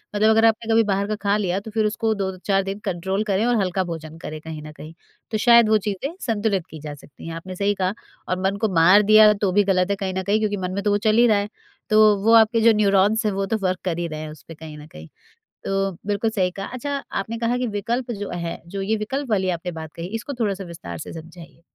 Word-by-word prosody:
मतलब 215 +1 +4
अगर 220 +1 +4
आपने 225 0 +1
कभी 225 0 +5
बाहर 200 +1 0
का 215 - -1
खा 200 0 +2
लिया, 190 -2 -1
तो 215 +2 -10
फिर 215 0 +1
उसको 220 +1 0
2-4 195 0 -1
दिन 195 +1 -5
कंट्रोल 190 +2 -1
करें 200 +3 +1
और 245 0 +2
हल्का 185 0 0
भोजन 160 -2 -7
करें 155 -1 -7
कहीं 160 -1 -7
न 155 - -9
कहीं। 155 +1 -11 0.4
तो 220 - 0
शायद 235 0 +6
वो 215 - +5
चीज़ें 210 - -3
संतुलित 210 -6 0
की 155 - -10
जा 150 0 -7
सकती 145 +1 -13
हैं। 165 - -5
आपने 185 +3 -8
सही 200 +2 +1
कहा 185 +1 +1 0.3
और 185 - -1
मन 195 +1 0
को 220 - +3
मार 180 +5 +6
दिया, 215 +1 +7
तो 200 -2 -1
भी 205 +3 +4
गलत 185 -1 +1
है 200 - +1
कहीं 190 -1 -4
न 190 0 -2
कहीं 205 +3 +1
क्योंकि 210 -1 -1
मन 185 -1 -3
में 200 +1 -3
तो 205 - +1
वो 205 - +3
चल 215 - +4
ही 240 +1 +6
रहा 215 -3 +4
है। 200 +1 -2 0.4
तो 215 -1 +6
वो 225 +2 +4
आपके 225 0 +5
जो 230 0 +6
न्यूरॉन्स 210 +1 +2
हैं 210 - +2
वो 195 0 -1
तो 220 +3 -1
वर्क 185 -1 0
कर 175 -3 -1
ही 170 - -2
रहे 155 -2 -6
हैं 155 0 -6
उस 150 -4 -14
पे 165 - -10
कहीं 155 -1 -10
न 150 0 -11
कहीं। 80 - -12 0.6
तो 195 0 0 0.2
बिल्कुल 205 +2 0
सही 185 -4 0
कहा। 195 +2 -6
अच्छा, 280 +3 -3 0.2
आपने 220 +4 -3
कहा 235 +1 0
कि 250 0 -1
विकल्प 240 +3 -2
जो 205 -3 -5
है, 170 -1 -5
जो 195 +3 -5
ये 210 +3 0
विकल्प 260 +6 -4
वाली 190 -3 +1
आपने 180 +2 -6
बात 160 -2 -8
कही, 170 +1 -5
इसको 240 +5 -5
थोड़ा-सा 200 -4 -1
विस्तार 155 - -8
से - - -8
समझाइए। 165 +1 -12
200 Hz, 265 wpm, -22 LUFS, 180-215 Hz, 0.6 s, दिया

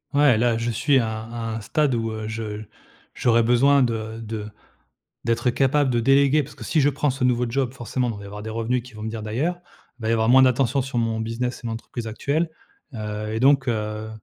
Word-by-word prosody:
Ouais, 140 -6 +5
là, 120 -1 +2
je 115 +1 -1
suis 135 +5 +2
à 110 -2 -1
à 115 -1 -5
un 110 - -4
stade 150 +5 +1
où, 115 -1 -1
heu, 110 0 -5
je 110 -1 -5 0.5
j'aurais 115 -1 +3
besoin 135 +4 +4
de 110 -1 -3
de 110 -1 -5 0.8
d'être 120 +1 +1
capable 135 +2 +2
de 120 -1 +1
déléguer. 140 +4 +4
Parce 145 +1 -11
que - - -10
si 155 - +1
je 140 - +4
prends 145 0 0
ce 130 0 -2
nouveau 125 -1 +2
job, 130 +1 -1
forcément, 125 +1 -2
il 110 - -5
va 100 - -9
y - - -9
avoir 105 +1 -8
des 110 - -6
revenus 115 +3 -1
qui 125 -2 -14
vont 105 - -8
venir 110 0 -4
d'ailleurs, 150 +12 -2 0.4
il - - -14
va 110 - -1
y - - +2
avoir 110 0 +2
moins 130 +1 +8
d'attention 130 +1 +3
sur 130 -1 -4
mon 115 -1 0
business 115 +3 -3
et - - -6
mon 115 - -2
entreprise 115 +1 -7
actuelle, 145 +9 -1 0.5
heu 105 0 -4
et - - -1
donc, 135 0 +4
heu 110 -1 -2
115 Hz, 230 wpm, -23 LUFS, 110-130 Hz, 0.8 s, moins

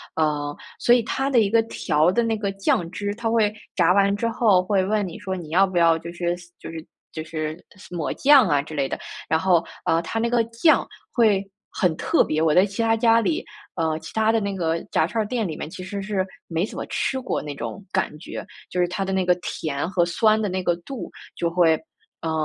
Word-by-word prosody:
嗯， 150 -2 0 0.2
所 240 - +4
以 245 - +5
它 270 +4 -1
的 255 -4 +4
一 205 -3 +3
个 230 +1 +4
调 160 -6 +1
的 235 - +2
那 225 -1 0
个 200 -2 -2
酱 185 -3 0
汁， 205 +2 -3
它 230 0 -2
会 220 -2 +2 0.2
炸 180 -1 +4
完 200 0 +3
之 230 +2 -1
后 220 -5 +3
会 190 0 +1
问 205 0 0
你 170 - -8
说 190 0 -3
你 160 -3 -8
要 190 +4 +4
不 185 -2 -4
要 165 -1 +5
就 170 +1 -8
是 175 0 -1 0.2
就 - - -8
是 160 -1 -7 0.3
就 155 - -4
是 155 0 -4 0.3
抹 170 -4 -3
酱 275 -3 +6
啊 145 -1 +3
之 155 +2 -10
类 140 -2 0
的。 - - -4 0.3
然 160 +1 +3
后， 175 -2 +3 0.2
呃， 165 - +2
它 225 +7 -3
那 235 +1 +1
个 235 -1 +3
酱 230 +8 +3 0.3
会 215 -6 +4 0.3
很 180 -5 +1
特 - - +2
别， 155 0 -1
我 160 -1 +3
在 185 +4 +6
其 205 +3 -4
他 225 0 +3
家 230 0 +4
里， 320 - 0 0.3
呃， 160 -2 0
其 160 - -11
他 220 0 +3
的 225 - +2
那 200 -2 -3
个 165 -2 0
炸 160 - +2
串 220 +4 -1
儿 205 - -6
店 230 -4 -1
里 155 -3 -5
面 - - -5
其 185 - -8
实 200 +2 -5
是 195 -2 0 0.2
没 165 +3 0
怎 - - -9
么 - - -3
吃 265 - -1
过 260 - -2
那 145 -1 -6
种 115 - -6
感 - - -1
觉。 170 - -7 0.2
就 180 - -3
是 175 - +3
它 185 +2 -3
的 195 - -3
那 190 -1 +1
个 180 - +5
甜 150 -2 -3
和 180 -3 +2
酸 215 +5 +3
的 210 - 0
那 185 +1 -2
个 175 - +2
度 250 +8 -7 0.3
就 170 - 0
会， 170 -2 +4 0.5
呃， 165 -1 -2
185 Hz, 255 characters per minute, -23 LUFS, 165-220 Hz, 0.5 s, 酱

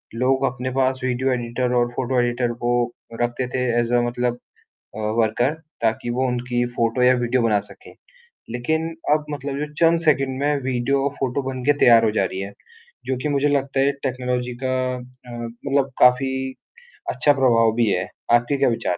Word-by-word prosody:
लोग 130 +3 +1
अपने 125 0 -3
पास 130 0 +1
video 130 +1 0
editor 125 +1 -2
और 120 0 +3
फ़ोटो 130 0 0
एडिटर 120 0 0
को 120 - +1 0.5
रखते 120 +1 -1
थे - - 0 0.2
ऐज़ 120 0 0
अ 120 - +4
मतलब 120 0 -2 0.6
अ, - - -6 0.2
वर्कर 120 +6 +1 0.3
ताकि 115 +1 0
वो 130 - +2
उनकी 120 0 -1
फ़ोटो 115 +2 +1
या 125 +1 +6
वीडियो 120 +1 +1
बना 105 -3 +2
सकें। - - -14 0.6
लेकिन 160 +7 -1 0.2
अब 150 0 +2
मतलब 140 -1 -4
जो 150 0 -4
चंद 165 0 +5
सेकंड 135 -5 +1
में 145 +1 +1
वीडियो 130 +2 0
और 140 - +1
फ़ोटो 135 +1 -1
बन 130 -1 -6
के 145 - +5
तैयार 115 -2 +7
हो 110 - +3
जा - - +2
रही 95 0 -4
है। 100 +1 -5 0.5
जो 130 - -1
कि 150 - -1
मुझे 145 0 +1
लगता 140 -1 0
है 140 +1 +3
टेक्नोलॉजी 125 -1 -2
का 130 0 0 0.2
अ, 125 0 -14
मतलब 125 +4 -2
काफ़ी 125 +2 +5 0.8
अच्छा 145 - +3
प्रभाव 115 -5 +3
भी 115 -2 +2
है। 90 -1 -1 0.3
आपके 120 +4 +3
क्या 135 -1 +3
विचार? 100 -6 -1
125 Hz, 185 wpm, -22 LUFS, 120-135 Hz, 0.8 s, तैयार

